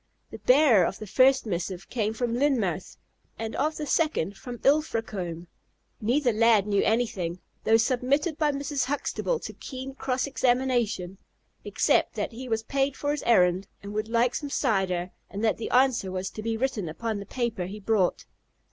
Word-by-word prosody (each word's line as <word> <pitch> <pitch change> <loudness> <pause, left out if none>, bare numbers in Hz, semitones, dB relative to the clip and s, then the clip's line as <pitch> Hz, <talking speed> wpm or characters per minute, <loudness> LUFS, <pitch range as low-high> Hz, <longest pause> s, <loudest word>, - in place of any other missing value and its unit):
The - - -8
bearer 255 - +5
of - - -5
the 215 - -7
first 260 +6 +4
missive 180 -1 -4
came 220 -2 -1
from 235 0 -1
Lynmouth, 235 - 0 0.4
and 225 0 -4
of 310 +2 0
the 300 - -3
second 290 - 0
from 245 +4 -8
Ilfracombe. 220 - 0 0.6
Neither 245 +3 +2
lad 220 -2 +4
knew 200 -1 +2
anything 195 -7 0 0.3
(though 225 - +5
submitted 260 +7 +1
by 300 -2 +3
Mrs. 280 0 -2
Huxtable 290 - -1
to - - -6
keen 265 0 -7
cross 260 -1 -1
examination), 245 -8 0 0.4
except - - +1
that - - -2
he 250 +2 -8
was 225 -1 0
paid 275 +3 -1
for 290 - -1
his 295 - -2
errand, 185 -4 +4 0.2
but 200 - -7
would 215 +1 -2
like 235 +1 +2
some 290 - -4
cider, 190 -9 0 0.2
and 205 +2 -5
that 220 - +2
the 225 - -4
answer 245 -6 +3
was 185 +1 -3
to 215 - -7
be 225 +1 -2
written 220 -8 -1
upon 220 +6 -3
the 200 - -7
paper 230 -8 -2
he 205 +3 -7
brought. 200 -3 +1
230 Hz, 175 wpm, -27 LUFS, 200-265 Hz, 0.6 s, bearer